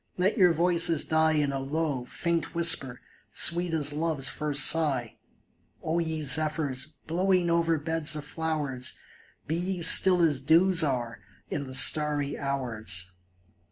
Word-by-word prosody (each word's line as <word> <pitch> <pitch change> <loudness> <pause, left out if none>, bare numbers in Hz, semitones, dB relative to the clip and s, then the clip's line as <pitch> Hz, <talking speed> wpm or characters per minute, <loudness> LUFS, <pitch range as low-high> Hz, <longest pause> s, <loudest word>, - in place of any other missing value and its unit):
Let 185 +3 0
your 185 -6 +3
voices 170 -1 +1
die 160 0 0
In 145 -2 -1
a 135 - -4
low, 140 -2 -4
faint 170 +3 -4
whisper, 135 -7 +2 0.3
sweet 175 +1 +3
as 150 -2 0
love's 150 -3 0
first 150 -1 +1
sigh; 135 -8 -1 0.7
O 160 +2 -2
ye 160 -2 -4
zephyrs, 150 -1 -1
blowing 180 +1 -1
over 165 -1 0
beds 160 0 -1
of 150 -1 -8
flowers. 150 -5 -4 0.5
Be 160 - -4
ye 180 0 -4
still 180 +1 +6
as 145 -5 0
dews 165 +5 +3
are 125 -6 -4 0.3
in 140 - -4
the 130 -1 -5
starry 145 -1 +3
hours 110 -10 -3
155 Hz, 140 wpm, -26 LUFS, 140-165 Hz, 0.7 s, still